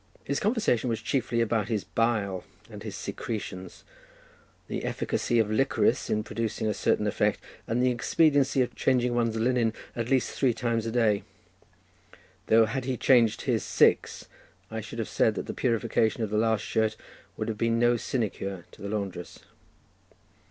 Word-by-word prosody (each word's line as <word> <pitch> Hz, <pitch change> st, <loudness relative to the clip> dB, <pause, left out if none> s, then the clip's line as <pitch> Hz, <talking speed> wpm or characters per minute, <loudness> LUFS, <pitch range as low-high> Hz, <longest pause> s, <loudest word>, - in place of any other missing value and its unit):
His 140 Hz, -, -1 dB
conversation 205 Hz, -, +1 dB
was 115 Hz, -, -1 dB
chiefly 120 Hz, -3 st, 0 dB
about 110 Hz, -2 st, 0 dB
his 110 Hz, -4 st, -1 dB
bile 105 Hz, -5 st, 0 dB, 0.3 s
and -, -, -9 dB
his -, -, -6 dB
secretions, 95 Hz, -4 st, -6 dB, 0.8 s
the -, -, -4 dB
efficacy 120 Hz, -, -1 dB
of 110 Hz, -2 st, +2 dB
licorice 110 Hz, -, +1 dB
in 105 Hz, 0 st, 0 dB
producing 110 Hz, 0 st, -3 dB
a 105 Hz, -, +1 dB
certain 105 Hz, +1 st, +1 dB
effect, 105 Hz, -, +1 dB, 0.3 s
and 120 Hz, +2 st, +1 dB
the 130 Hz, -, +4 dB
expediency 140 Hz, +2 st, +3 dB
of 125 Hz, -, -5 dB
changing 125 Hz, -2 st, +1 dB
one's 115 Hz, -2 st, +1 dB
linen 115 Hz, -1 st, +1 dB, 0.2 s
at 115 Hz, 0 st, -3 dB
least 130 Hz, -2 st, +2 dB
three 125 Hz, -4 st, +1 dB
times 115 Hz, -1 st, -1 dB
a -, -, -2 dB
day; 110 Hz, -4 st, +2 dB, 1.3 s
though 115 Hz, 0 st, +6 dB
had 130 Hz, +3 st, -3 dB
he 130 Hz, -1 st, -1 dB
changed 120 Hz, -4 st, +4 dB
his -, -, 0 dB
six -, -, +2 dB, 0.5 s
I -, -, -3 dB
should -, -, -9 dB
have -, -, -2 dB
said -, -, +2 dB
that -, -, -4 dB
the -, -, -5 dB
purification 115 Hz, -1 st, +1 dB
of 105 Hz, -, -3 dB
the 105 Hz, -, +1 dB
last 110 Hz, -2 st, +2 dB
shirt 110 Hz, 0 st, 0 dB, 0.4 s
would -, -, -3 dB
have 110 Hz, -2 st, -4 dB
been 115 Hz, 0 st, +2 dB
no 120 Hz, +1 st, +4 dB
sinecure 100 Hz, -7 st, -3 dB
to -, -, -16 dB
the 100 Hz, -, -5 dB
laundress. 100 Hz, -4 st, -5 dB
115 Hz, 165 wpm, -27 LUFS, 110-125 Hz, 1.3 s, though